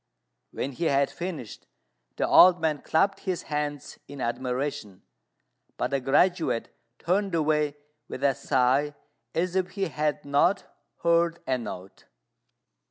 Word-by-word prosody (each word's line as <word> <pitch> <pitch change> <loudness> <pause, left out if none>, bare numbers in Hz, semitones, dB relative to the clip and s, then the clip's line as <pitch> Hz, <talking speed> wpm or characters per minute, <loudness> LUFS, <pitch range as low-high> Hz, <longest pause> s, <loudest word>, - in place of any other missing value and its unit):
When 135 - -4
he 165 +6 -3
had 140 -2 +2
finished, 170 - -7 0.5
the - - 0
old 180 -1 +7
man 155 -3 0
clapped 195 +5 +1
his 185 -3 -3
hands 150 -2 -4
in 140 0 -10
admiration; 125 -3 -3 0.7
but - - -1
the 140 - +1
graduate 145 0 +1 0.2
turned 190 +1 0
away 150 -2 +1 0.3
with - - -7
a 140 -1 +4
sigh, 135 +4 +1 0.4
as 180 +2 0
if 185 -1 +1
he 195 -3 -2
had 150 -1 -2
not 145 +8 +2 0.4
heard 170 0 +3
a 130 -1 0
note. 95 -5 -9
150 Hz, 130 wpm, -26 LUFS, 135-170 Hz, 0.7 s, old